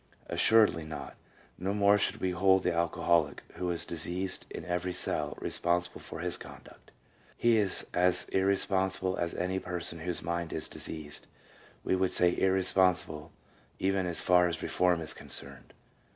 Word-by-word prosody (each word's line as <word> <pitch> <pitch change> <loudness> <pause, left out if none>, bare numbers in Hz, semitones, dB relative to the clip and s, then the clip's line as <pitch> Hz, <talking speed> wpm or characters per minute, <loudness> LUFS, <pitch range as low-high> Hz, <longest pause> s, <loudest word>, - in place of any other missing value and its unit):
Assuredly 110 -7 +4
not; 75 -1 -8 0.4
no 95 +3 -2
more 100 0 +4
should - - 0
we 95 - -1
hold 95 +1 +3
the 90 - +1
alcoholic, 85 -2 +1
who 90 - -2
is 85 -1 0
diseased 90 +3 -1
in - - -8
every 90 +1 -2
cell, 90 - -2
responsible 85 0 -1
for - - -8
his - - 0
conduct. - - -14 0.5
He 120 -1 +3
is 100 -3 +1
as 90 0 +3
irresponsible 95 -1 +1
as 85 -1 -2
any 95 +1 -1
person 90 -2 -4
whose 85 +1 -4
mind 85 0 -3
is 80 - -1
diseased; 75 -2 -4 0.6
we - - +1
would 95 0 0
say 90 0 +4
irresponsible 90 -4 +1 0.5
even 95 -1 0
as 85 - +4
far 90 -1 +4
as 85 - -4
reform 90 -2 +1
is 80 - 0
concerned. - - -4
90 Hz, 150 wpm, -30 LUFS, 85-95 Hz, 0.6 s, Assuredly